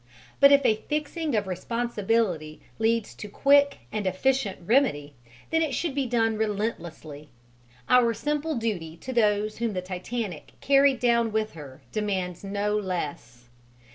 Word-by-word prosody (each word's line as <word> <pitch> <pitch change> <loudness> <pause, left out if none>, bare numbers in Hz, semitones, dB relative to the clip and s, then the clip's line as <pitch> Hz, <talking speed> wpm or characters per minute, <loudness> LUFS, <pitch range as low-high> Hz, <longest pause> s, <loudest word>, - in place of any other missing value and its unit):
But 280 0 +8
if 280 -1 +5
a 215 - +4
fixing 305 -1 -2
of 210 -1 +1
responsibility 200 -5 -1 0.2
leads 225 0 +1
to 210 - -8
quick 280 +5 +3
and 210 -3 -2
efficient 210 +2 0
remedy, 175 - +2 0.4
then 325 0 +2
it 300 -5 0
should 330 0 -2
be 275 -2 -1
done 225 -2 +1
relentlessly: 175 -9 -4 0.6
our 250 -2 +5
simple 300 +1 -2
duty 185 -9 -3
to 260 +9 -7
those 210 -2 +1
whom 230 -2 -1
the 185 - -2
Titanic 185 0 -5
carried 275 -1 +4
down 235 -2 +2
with 220 0 -1
her 140 -4 -11
demands 190 -4 -2
no 205 +1 -1
less. 145 - -4
220 Hz, 140 wpm, -26 LUFS, 185-250 Hz, 0.6 s, But